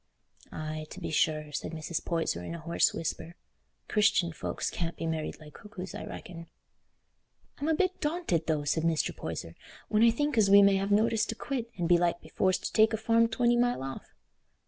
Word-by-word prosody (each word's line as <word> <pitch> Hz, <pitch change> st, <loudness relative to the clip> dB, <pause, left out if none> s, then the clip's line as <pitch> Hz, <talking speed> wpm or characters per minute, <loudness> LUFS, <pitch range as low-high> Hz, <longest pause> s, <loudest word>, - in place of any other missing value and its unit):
"Aye, 155 Hz, 0 st, -5 dB
to -, -, -9 dB
be -, -, -5 dB
sure," 155 Hz, -1 st, +1 dB
said 150 Hz, +2 st, -4 dB
Mrs. 160 Hz, +1 st, -4 dB
Poyser, 165 Hz, -, -1 dB
in 170 Hz, -, -5 dB
a -, -, -7 dB
hoarse 170 Hz, +2 st, +2 dB
whisper; 165 Hz, +1 st, -5 dB, 0.5 s
"Christian 205 Hz, -6 st, +2 dB
folks -, -, -3 dB
can't 170 Hz, -1 st, -3 dB
be -, -, -4 dB
married 160 Hz, -1 st, -3 dB
like 150 Hz, -1 st, -13 dB
cuckoos, 200 Hz, -3 st, -9 dB
I -, -, -6 dB
reckon." 170 Hz, -2 st, -9 dB, 1.1 s
"I'm 290 Hz, -, -2 dB
a 320 Hz, -, +3 dB
bit 370 Hz, +3 st, 0 dB
daunted, 295 Hz, -, -1 dB
though," 155 Hz, -2 st, 0 dB
said 155 Hz, +2 st, 0 dB
Mr. 165 Hz, -1 st, 0 dB
Poyser, -, -, -6 dB, 0.4 s
"when 215 Hz, 0 st, +2 dB
I 235 Hz, -, +7 dB
think 275 Hz, +2 st, 0 dB
as 200 Hz, -2 st, +4 dB
we 200 Hz, 0 st, +8 dB
may 200 Hz, -1 st, +5 dB
have 195 Hz, +1 st, -1 dB
notice 220 Hz, +2 st, +2 dB
to 225 Hz, -, -3 dB
quit, 245 Hz, -1 st, -4 dB
and 175 Hz, -2 st, -1 dB
belike 175 Hz, 0 st, +3 dB
be -, -, -15 dB
forced 185 Hz, -1 st, +1 dB
to -, -, -4 dB
take 220 Hz, 0 st, +4 dB
a -, -, +1 dB
farm 230 Hz, +1 st, +3 dB
twenty 240 Hz, +1 st, +2 dB
mile 245 Hz, -, +1 dB
off." 135 Hz, 0 st, -8 dB
180 Hz, 200 wpm, -29 LUFS, 160-225 Hz, 1.1 s, we